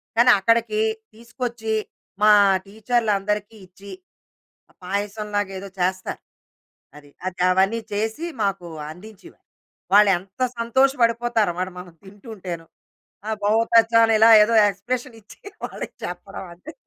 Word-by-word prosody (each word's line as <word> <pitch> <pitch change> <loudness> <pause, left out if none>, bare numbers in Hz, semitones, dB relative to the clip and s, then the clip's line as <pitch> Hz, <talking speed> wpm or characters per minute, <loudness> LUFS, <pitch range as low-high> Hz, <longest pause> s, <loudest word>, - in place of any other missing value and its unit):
కానీ 240 +2 +6
అక్కడికీ 230 0 +1 0.3
తీసుకొచ్చి, 235 -1 -5 0.5
మా 210 0 +6 0.3
టీచర్లందరికీ 210 -1 -1
ఇచ్చి, 195 +2 -14 0.9
పాయసం 205 +3 -4
లాగా 205 -1 -1
ఏదో 200 - -8
చేస్తారు. 185 +1 -2 0.8
అది. 145 -1 -16 0.2
అది 185 - -6
అవన్నీ 195 +5 +2
చేసి 220 +10 -2 0.2
మాకు 195 -3 -2 0.3
అందించేవారు. 195 +4 -14 0.5
వాళ్ళేంత 195 +1 +3 0.2
సంతోషపడిపోతారో 235 -4 +1
మరి 185 +1 -3
మనం 180 -2 -11
తింటుంటేను. 190 -4 -9 0.6
ఆ! - - -3
బహుత్ 225 +2 +1
అచ్చా! 230 0 +1
అని 225 - +2
ఇలా 225 - +7
ఏదో 230 +2 +2 0.2
ఎక్స్ప్రెషన్ 240 +5 -5
ఇచ్చి - - -17 0.3
వాళ్ళకి - - -8
చెప్పడం - - -7
అదే. 290 - -12
210 Hz, 115 wpm, -22 LUFS, 195-230 Hz, 0.9 s, ఇలా